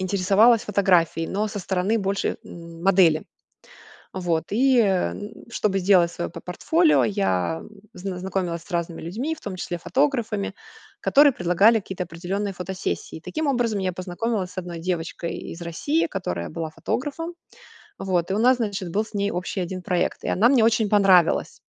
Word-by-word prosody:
интересовалась 200 +5 +4
фотографией, 180 -6 +2
но 210 +2 -1
со 205 - -5
стороны 190 +3 0
больше, 195 0 -1
м, 170 0 -11
модели. 180 -5 +4 0.9
Вот 175 -3 -1
и, 205 - -1 0.2
э, 190 - +2
н - - -7
н 210 - -10
чтобы 200 -3 0
сделать 180 -2 +4
свое 170 - -4
по - - -9
портфолио, 320 - +2
я 165 - 0
м, - - -12 0.3
зны 185 0 -5
знакомилась 180 -3 -2
с - - -17
разными 170 -1 -2
людьми, 230 - -3
в - - -16
том 200 -3 -5
числе 175 -1 -4
фотографами, 230 - 0 0.5
которые 285 +1 +6
предлагали 180 +4 +4
какие-то 190 -2 -5
определенные 190 +4 -4
фотосессии. 180 -2 -4
Таким 310 - -3
образом, 240 -6 +1
я 185 -1 0
познакомилась 185 +2 -3
с - - -18
одной 175 -2 -5
девочкой 170 -1 -3
из 170 - -9
России, 285 - 0
которая 90 - -4
была 165 -1 -4
фотографом. 285 - -4 0.7
Вот 180 -2 -1
и - - +1
у - - 0
нас, 250 +3 +5
значит, 205 -6 -3
был 200 - 0
с 220 - -17
ней 200 0 0
общий 180 +1 -3
один 185 +1 -5
проект, 180 0 -1
и - - -2
она 215 +6 +4
мне 250 -4 +4
очень 220 -1 +3
понравилась, 195 -4 +3
190 Hz, 170 wpm, -24 LUFS, 175-215 Hz, 0.9 s, которые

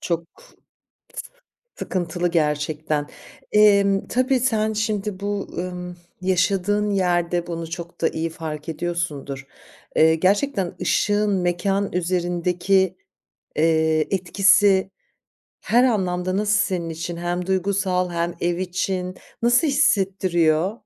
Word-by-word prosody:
Çok 170 -1 -2 0.2
s - - -21 1.3
sıkıntılı 175 -1 -2
gerçekten. 150 -1 -1 0.5
Emm, 200 -2 +4
tabii 255 +1 +1
sen 220 -3 +1
şimdi 210 -2 -2
bu, 205 0 -3
ımm, 180 0 -5 0.2
yaşadığın 195 +3 +1
yerde 175 -2 0
bunu 165 -1 -5
çok 170 0 -7
da 165 - +3
iyi 165 +1 -3
fark 160 -2 -7
ediyorsundur. 155 -5 -4 0.5
Eee, 160 +1 +5
gerçekten 195 - +1
ışığın 205 0 +1
mekân 195 +2 0
üzerindeki, 180 +1 0 0.6
eee, 160 0 +2
etkisi 195 +1 +3 0.7
her 240 +2 +3
anlamda 185 -6 0
nasıl 210 0 +2
senin 175 -4 -1
için 165 +1 -5
hem 175 +1 -2
duygusal 190 -1 0
hem 170 0 -2
ev 175 0 0
için 185 0 -2 0.3
nasıl 245 +7 +4
hissettiriyor? 190 - +2
180 Hz, 105 wpm, -22 LUFS, 170-200 Hz, 1.3 s, Eee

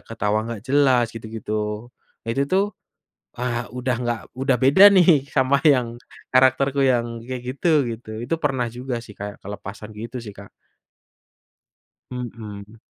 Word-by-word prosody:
ketawa 105 -2 -1
nggak 115 -3 -6
jelas 130 -3 +4
gitu-gitu, 110 0 -4 0.3
nah, 115 - -4
itu 135 - +1
tuh, 195 +2 +3 0.7
ah, 120 -1 -2
udah 125 0 -1
nggak 120 -2 -1 0.2
udah 135 0 +1
beda 145 +10 +8
nih 165 -7 +5
sama 130 +1 +4
yang 130 -5 +4 0.5
karakterku 130 +2 +4
yang 120 -1 -1
kayak 130 -1 -4
gitu-gitu, 125 -8 0
itu 165 - -1
pernah 130 -4 +1
juga 125 +1 -4
sih 105 - -12
Kak, 105 0 -6
kelepasan 105 +2 -8
gitu 115 +4 -6
sih, 105 - -8
Kak. 100 0 -12 1.6
Mhm. 110 -3 -8
120 Hz, 135 wpm, -22 LUFS, 110-135 Hz, 1.6 s, beda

